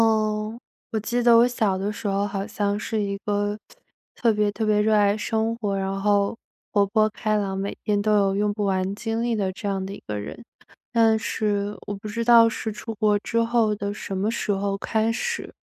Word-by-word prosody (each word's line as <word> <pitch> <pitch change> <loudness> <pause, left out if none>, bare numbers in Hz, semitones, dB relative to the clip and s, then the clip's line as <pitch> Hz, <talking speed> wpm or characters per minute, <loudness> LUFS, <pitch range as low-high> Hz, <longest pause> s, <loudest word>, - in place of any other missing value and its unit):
哦， 215 0 +1 0.4
我 220 - +1
记 240 +3 -1
得 235 -1 +6
我 235 +1 +6
小 215 -6 0
的 200 +2 -2
时 210 - -5
候 200 0 +1
好 195 -1 -3
像 205 -1 -1
是 220 0 -2
一 200 0 -2
个 205 0 0 0.6
特 235 - +2
特 - - 0
别 210 -1 +1
特 220 +2 -2
别 210 -1 +3
热 215 +1 +3
爱 205 -1 +4
生 220 +1 -1
活， 205 -4 -2
然 195 0 -2
后 205 +1 +2 0.4
活 205 -2 +4
泼 215 +1 +3
开 215 0 -1
朗， 195 -2 -2
每 195 +1 -4
天 205 -1 +1
都 215 +1 +1
有 195 -1 +2
用 205 +1 +1
不 205 0 -2
完 190 0 0
精 225 +1 -2
力 235 -1 0
的 195 -3 -1
这 205 +2 -6
样 195 -1 -2
的 195 - -6
一 - - -10
个 105 -1 -3
人。 105 - -8 0.5
但 225 -2 +4
是 205 -2 -1
我 205 - -3
不 200 +2 -8
知 230 +2 -3
道 230 -1 +7
是 220 0 -4
出 225 +2 -7
国 210 -1 +2
之 230 +3 0
后 230 -2 +2
的 200 0 -3
什 195 -2 -5
么 205 +4 0
时 215 - -2
候 200 0 -1
开 220 +2 0
始， 470 - -3
210 Hz, 240 characters per minute, -24 LUFS, 200-225 Hz, 0.6 s, 道